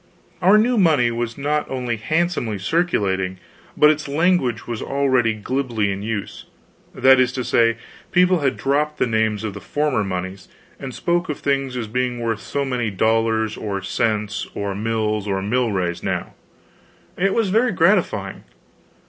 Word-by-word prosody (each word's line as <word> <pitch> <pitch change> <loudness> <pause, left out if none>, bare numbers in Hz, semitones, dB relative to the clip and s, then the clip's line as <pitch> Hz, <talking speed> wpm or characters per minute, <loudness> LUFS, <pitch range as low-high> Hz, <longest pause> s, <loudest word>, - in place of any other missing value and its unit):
Our 190 +4 +6
new 235 +2 +3
money 150 -10 +4
was 115 0 -3
not 150 +2 -1
only 125 -3 -2
handsomely 155 - -1
circulating, 95 - 0 0.4
but 150 0 +7
its 155 -1 -3
language 145 -6 +1
was 115 -2 -5
already 130 -5 +1
glibly 115 -2 -1
in 95 0 -4
use; 105 -1 -5 0.5
that 130 0 +6
is 130 -1 +3
to 130 - -2
say, 115 -1 +2 0.3
people 180 0 +4
had 135 -3 0
dropped 150 +2 0
the - - +2
names 110 -2 0
of 110 -2 -3
the - - -7
former 145 -6 0
moneys, 95 0 -5 0.3
and 135 -1 -6
spoke 175 0 0
of 150 - -2
things 135 -2 -1
as 120 - -2
being 125 +2 -2
worth 115 -2 -1
so 140 +8 -2
many 125 -4 -1
dollars 110 +1 +1
or 100 -2 -3
cents 105 0 -1
or 100 -1 -2
mills 110 0 -1
or 95 -1 0
milrays 100 -5 -1
now. - - -3 0.8
It 195 +1 +1
was 225 -4 +1
very 225 +5 +2
gratifying. 165 - +1
120 Hz, 155 wpm, -21 LUFS, 105-150 Hz, 0.8 s, but